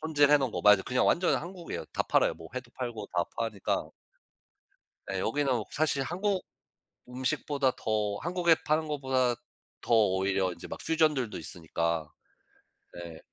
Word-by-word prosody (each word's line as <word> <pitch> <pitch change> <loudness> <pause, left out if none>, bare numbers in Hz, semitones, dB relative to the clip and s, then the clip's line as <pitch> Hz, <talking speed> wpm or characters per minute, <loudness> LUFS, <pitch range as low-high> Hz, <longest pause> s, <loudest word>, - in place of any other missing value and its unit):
손질해 150 -2 +4
놓은 135 -3 -1
거. - - -3
맞아 105 -2 +7
그냥 125 0 +1
완전 175 +1 +3
한국이에요. 175 -1 -6
다 - - +1
팔아요 - - +2
뭐 80 - -11
회도 125 -2 -6
팔고 120 -5 -5
다 85 - +2
파니까. 110 -4 -1 1.2
네. 95 -1 -2
여기는 125 0 0
사실 145 -2 +1
한국 185 +5 -1 0.6
음식보다 130 +2 0
더 105 -2 -1
한국에 175 -1 +3
파는 155 +1 +1
것보다 130 -4 +1 0.5
더 120 - 0
오히려 95 -2 +2
이제 85 - -10
막 - - -7
퓨전들도 155 -8 +1
있으니까 85 -2 -2 0.8
네. 85 -2 -8
125 Hz, 300 characters per minute, -29 LUFS, 100-150 Hz, 1.2 s, 맞아